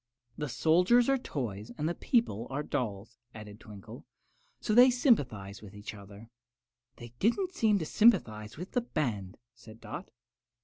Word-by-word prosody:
"The 150 -1 -4
soldiers 180 - +3
are 270 - +4
toys 115 - -5
and 150 - -1
the 170 - 0
people 170 - 0
are 140 +2 -3
dolls," 115 -5 -4 0.2
added 105 -1 -10
Twinkle; 105 -5 -11 0.6
"so 215 - -1
they 245 +3 +8
sympathize 140 - +1
with 105 -1 -12
each 105 +1 -8
other." 100 +2 -13 0.6
"They 120 - -10
didn't 360 - +1
seem 220 - +2
to 165 - -3
sympathize 120 - +2
with 180 +4 -7
the 245 - +1
band," 115 - -3 0.2
said 115 -1 -15
Dot. 180 - -8
125 Hz, 150 wpm, -30 LUFS, -, 0.6 s, they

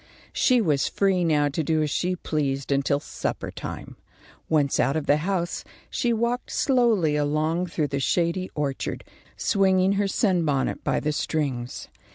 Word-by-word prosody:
She 250 -2 +3
was 150 -9 +1
free 195 -3 +1
now 150 -3 +3
to 150 +3 -2
do 155 +1 +1
as 150 - -2
she 180 +4 0
pleased 140 -5 -2
until 140 +1 +2
supper 150 - -4
time. - - -7 0.5
Once 145 -3 +2
out 135 +4 +2
of 155 -2 -1
the 145 - +4
house, 175 +1 -2 0.3
she 240 - 0
walked 235 +2 -1
slowly 230 - +2
along 155 +4 0
through 155 -3 -1
the 140 0 -1
shady 170 +6 0
orchard, 145 -3 -3 0.3
swinging 190 -1 +3
her 200 0 +1
sunbonnet 170 - 0
by - - 0
the 150 - 0
strings. 135 -5 -2
160 Hz, 155 wpm, -25 LUFS, 145-190 Hz, 0.5 s, the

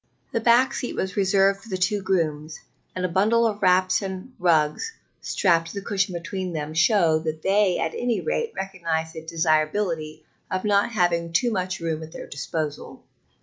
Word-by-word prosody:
The - - 0
back 240 +3 +4
seat 245 - -4
was 190 -1 -3
reserved 195 0 +3
for 225 - -14
the 190 - -2
two 200 +3 +1
grooms, 160 -5 -1 0.4
and 185 0 -1
a - - +2
bundle 215 +6 +3
of 210 -2 -1
wraps 185 0 +3
and 190 +5 -6
rugs 165 - +2 0.3
strapped 165 -3 +2
to - - -9
the 200 -1 -5
cushion 195 -2 0
between 180 +1 -4
them 155 -1 -4
showed 160 -2 +3
that 155 0 -3
they 195 -1 +3
at 160 - -2
any 245 -2 -1
rate 465 -1 -2
recognized 165 -4 -3
the 160 - -7
desirability 155 0 0 0.2
of 185 +2 -2
not 205 +2 +2
having 170 -4 +1
too 235 +9 +2
much 185 -3 -2
room 160 -1 -2
at 160 0 -9
their - - -7
disposal. 150 +1 -5
185 Hz, 180 wpm, -24 LUFS, 160-200 Hz, 0.4 s, back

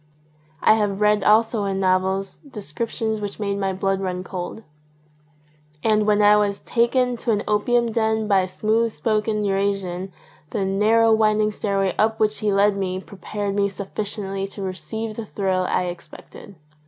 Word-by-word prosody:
I - - +7
have 205 -2 0
read 210 -1 +3
also 220 0 +3
in 195 -1 -1
novels 190 +1 0
descriptions 220 - -3
which 205 0 -5
made 200 -1 -2
my 195 -1 0
blood 195 +1 -1
run 180 -1 -3
cold. 185 +4 -6 1.2
And 215 -1 +2
when 210 0 +3
I 210 0 +6
was 205 -1 +1
taken 245 +2 +1
to 235 - -5
an 210 -2 +1
opium 235 +3 +1
den 220 -1 0
by 200 -2 +4
a 185 - -2
smooth 220 +5 0
spoken 215 -1 -1
Eurasian 195 -2 -1 0.4
the 200 -3 -2
narrow, 220 +4 +3
winding 215 -1 +2
stairway 195 -2 -1
up 220 +1 +2
which 215 -1 +1
he 215 -2 0
led 200 +1 +3
me 185 -1 -2
prepared 200 +1 -5
me 200 0 +1
suffi 200 +1 -5
ciently 195 -2 -3
to 200 - -6
receive 195 +5 -5
the 230 - -4
thrill 185 -3 -1
I - - +1
expected. 180 +3 -9
205 Hz, 165 wpm, -22 LUFS, 195-220 Hz, 1.2 s, I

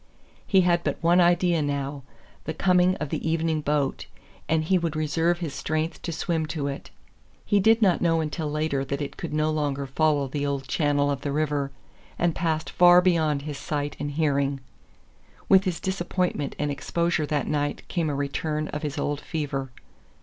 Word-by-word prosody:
He 190 -2 +5
had 175 -1 +2
but - - -1
one 175 +2 +5
idea 175 -1 +3
now 140 -1 -2 0.4
the 160 - -4
coming 180 0 +3
of 150 -6 -4
the 160 - -2
evening 160 -1 0
boat, 145 -2 -1 0.4
and 160 0 +2
he 185 +3 +2
would 165 -2 -2
reserve 160 +3 +1
his 165 -5 -4
strength 155 +3 -2
to 170 - -4
swim 160 0 -1
to 150 -3 -3
it. 140 -1 -5 0.6
He 205 - +3
did 225 +3 +4
not 185 -4 +3
know 165 -1 +3
until 155 0 -2
later 150 -2 -1
that 140 +1 -3
it 145 -2 -5
could - - -6
no 155 +1 +1
longer 145 -2 -1
follow 145 0 +1
the 140 +2 -3
old 140 -2 -2
channel 145 -1 +1
of 140 - -3
the 145 - -2
river, 145 -1 0 0.5
and 170 -1 +1
passed 155 -3 -1
far 175 0 +7
beyond 160 -6 +2
his 150 -2 -5
sight 145 -1 -3
and 145 - -2
hearing. 140 -2 0 0.9
With 190 0 +5
his 175 -3 -1
disappointment 180 -5 -2
and 145 0 -1
exposure 170 +3 -1
that 145 -3 0
night 145 -1 -2
came 165 -3 -1
a 145 - -2
return 150 +2 -2
of 150 - -4
his 150 -3 -4
old 145 0 -2
fever. 140 -5 -3
155 Hz, 185 wpm, -25 LUFS, 145-170 Hz, 0.9 s, far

